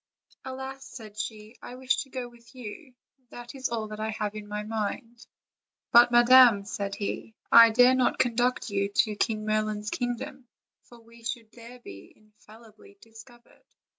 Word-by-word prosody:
"Alas!" 265 +1 -7
said 215 -4 -11
she, 215 +1 -7
"I 245 - -9
wish 260 +1 0
to 275 - -5
go 255 -2 -5
with 240 +1 -20
you; 250 +3 -10 0.3
that 240 +2 -10
is 265 -1 -3
all 225 -2 -3
that 215 0 -8
I 220 0 -3
have 210 -1 -3
in 210 -1 -9
my 210 0 -5
mind." 225 +2 -5 0.6
"But, 240 +1 +7
madam," 240 -3 +6
said 200 -1 -4
he, 215 +2 -5 0.2
"I 230 0 +9
dare 245 +3 +5
not 255 -1 +1
conduct 245 -1 0
you 200 0 -1
to 210 +1 +1
King 215 0 -1
Merlin's 215 -1 -2
kingdom, 245 +2 -5 0.4
for 240 - -17
we 230 0 -19
should 230 -1 -5
there 235 +1 -13
be 100 - -13
infallibly 215 0 -19
discovered." 230 +2 -17
230 Hz, 165 wpm, -27 LUFS, 215-245 Hz, 0.6 s, I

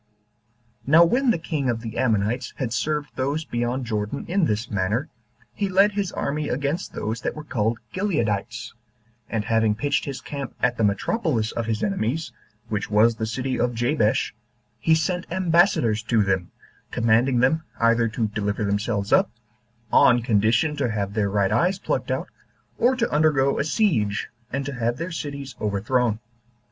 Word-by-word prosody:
Now 165 +4 +7
when 250 +9 +2
the 230 - +3
king 155 -5 -2
of 115 -1 -1
the 115 0 -5
Ammonites 120 0 0
had 125 -4 -2
served 150 +2 -1
those 140 +4 -1
beyond 120 +2 -2
Jordan 105 +3 -3
in 185 -1 +2
this 110 +1 -2
manner, 105 - -1 0.4
he 200 -1 -2
led 195 +2 +4
his 200 -3 -2
army 150 +1 -2
against 140 +7 -2
those 110 +3 -3
that - - -3
were 155 - -7
called 115 -5 -1 0.2
Gileadites, 115 - -1 0.6
and 110 -2 -2
having 110 -1 +2
pitched 140 +7 0
his 140 -2 -5
camp 140 -3 -6
at 120 -1 +1
the 115 - 0
metropolis 115 - 0
of 115 -1 -3
his 110 -1 -1
enemies, 160 - -1 0.4
which 105 -2 -3
was 110 +3 +4
the 110 0 -3
city 130 +3 -2
of 120 0 0
Jabesh, 120 -1 +1 0.5
he 160 - +4
sent 175 +2 -2
ambassadors 170 - +3
to 115 -1 +2
them, 95 -3 0 0.4
commanding 120 +2 +2
them 160 +6 +3 0.2
either 115 0 +3
to 115 0 -1
deliver 105 0 -2
themselves 100 0 -1
up, - - +5 0.6
on 120 -2 +5
condition 115 +6 +2
to 135 -4 0
have 100 -2 -2
their 105 -2 +1
right 100 -1 +1
eyes 180 +2 +2
plucked - - -2
out, - - -1 0.5
or 250 +3 +4
to 235 -2 +1
undergo 145 -3 +3
a - - +2
siege, 145 - +1 0.2
and 140 +1 -2
to 140 - -4
have 120 -1 -1
their 170 +3 -4
cities 140 -4 -5
overthrown. 110 +3 +1
120 Hz, 165 wpm, -24 LUFS, 110-155 Hz, 0.6 s, Now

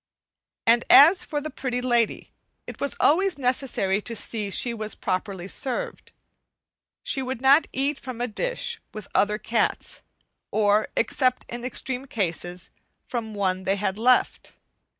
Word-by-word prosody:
And 235 +1 +4
as 345 +6 +8
for 300 -4 -3
the 310 +2 -6
Pretty 255 -2 -3
Lady, 240 -2 0 0.3
it - - -10
was 280 - -1
always 375 +4 +3
necessary 250 -7 0
to 230 +2 -5
see 215 0 -3
that 200 - +1
she 240 - +3
was 215 -2 -4
properly 185 -1 -3
served. 375 - -3 0.9
She 270 - +1
would 260 -2 -4
not 275 +4 +5
eat 275 +2 -1
from 255 -3 -8
a 245 - -1
dish 475 - -2
with 215 -2 -7
other 210 +1 +2
cats, 220 +1 -2 0.5
or, 210 0 +2
except 255 +2 +1
in 240 0 -6
extreme 260 +1 -2
cases, 180 -4 -3 0.4
from 225 -4 -4
one 190 -2 -1
they 195 +1 +1
had 200 0 -2
left. 250 +2 +2
240 Hz, 150 wpm, -25 LUFS, 210-270 Hz, 0.9 s, as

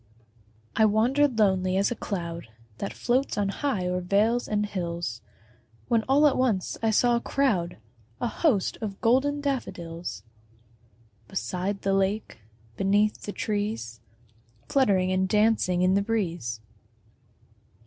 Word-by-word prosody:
I 220 - +5
wander'd 245 +5 +2
lonely 190 -3 +2
as 200 +4 +2
a - - -1
cloud 170 - -5 0.3
That 200 - -3
floats 255 +1 0
on 200 -1 +1
high 210 -4 -1
o'er 180 0 -1
vales 210 +6 +2
and 210 0 0
hills, 170 - -4 0.7
When 230 - +3
all 285 +3 +5
at 290 - +4
once 225 -8 +1
I 225 - +2
saw 240 +3 +3
a 235 - 0
crowd, 210 -14 0 0.4
A - - -1
host 230 - +1
of 200 -3 -5
golden 275 +5 +2
daffodils, 170 - -4 1.0
Beside 190 +1 -3
the 195 - +1
lake, 195 - -1 0.4
beneath 205 +2 +2
the 205 - -5
trees, 205 - -3 0.7
Fluttering 195 -9 +2
and 190 0 +1
dancing 210 -4 +2
in 185 +1 +4
the 200 - +3
breeze. 175 - -2
205 Hz, 130 wpm, -26 LUFS, 185-230 Hz, 1.0 s, I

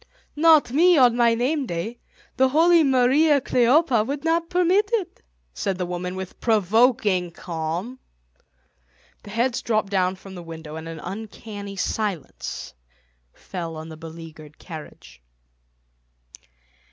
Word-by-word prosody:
"Not 310 -4 +5
me, 340 +5 +5
on 245 -3 +5
my 235 -1 +3
name 265 +3 0
day. 195 +7 -4 0.4
The 265 0 +3
holy 330 +4 +5
Mariä 275 +3 +4
Kleophä 255 -1 +3
would 280 +1 -4
not 330 +1 0
permit 365 +4 +2
it," 380 -6 -2 0.3
said 190 - -2
the 180 - -2
woman 180 +1 -4
with 190 -1 -7
provoking 215 -3 +2
calm. 170 +8 -5 1.2
The - - -13
heads 235 +4 0
dropped 215 -3 -1
down 185 -1 +1
from 190 0 -12
the 180 - -8
window 160 -2 -9
and 160 0 -7
an 165 -1 -7
uncanny 205 0 -7
silence 195 -3 -4 0.6
fell 170 -3 -6
on 160 +1 -8
the 160 - -9
beleaguered 160 -1 -11
carriage. 150 - -11
215 Hz, 130 wpm, -23 LUFS, 175-270 Hz, 1.2 s, Not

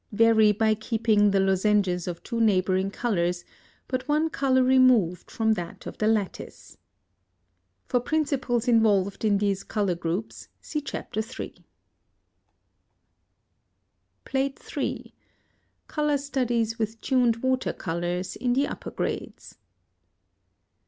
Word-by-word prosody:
Vary 220 0 +5
by 220 +1 +2
keeping 220 -1 +2
the 195 0 +2
lozenges 195 -2 +1
of 175 -2 -5
two 230 -1 -3
neighboring 190 -2 +2
colors, 180 -6 -1 0.4
but 255 0 -3
one 305 +2 +1
color 260 -2 +2
removed 255 -9 +3
from 220 -1 +1
that 175 -5 -6
of - - -7
the 215 - +1
lattice. 215 -3 -3 1.1
For 250 - +1
principles 265 -4 -1
involved 205 -5 +2
in 210 -2 +3
these 200 -1 0
color 205 -4 -1
groups, 170 +5 -4
see 300 - -4
Chapter 275 -6 -5
III. 230 +4 -5 2.7
PLATE 270 0 -3
III. - - -3 0.7
COLOR 300 -1 0
STUDIES 245 -5 -1
WITH 220 0 -2
TUNED 245 -3 +1
WATER 260 0 +1
COLORS 175 +1 -3
IN 245 -1 0
THE 275 +3 +2
UPPER - - -6
GRADES. - - -5
220 Hz, 115 wpm, -26 LUFS, 195-255 Hz, 2.7 s, Vary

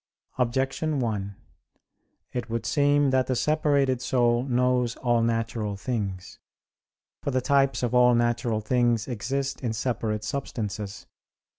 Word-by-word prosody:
Objection 135 +5 0
1: 100 -5 -2 1.0
It 125 -2 -4
would 115 0 -3
seem 145 -1 +3
that 130 -1 +2
the 130 - 0
separated 140 -3 +1
soul 120 -2 +2
knows 125 -2 +1
all 120 -2 +1
natural 115 -3 -1
things. 100 -5 -4 0.8
For - - -2
the 130 -1 +1
types 135 0 +2
of 120 0 0
all 125 0 +5
natural 120 -1 +1
things 120 0 +1
exist 135 +3 -3
in 120 -4 -1
separate 110 -2 -2
substances. 105 -5 -4
120 Hz, 125 wpm, -26 LUFS, 115-130 Hz, 1.0 s, all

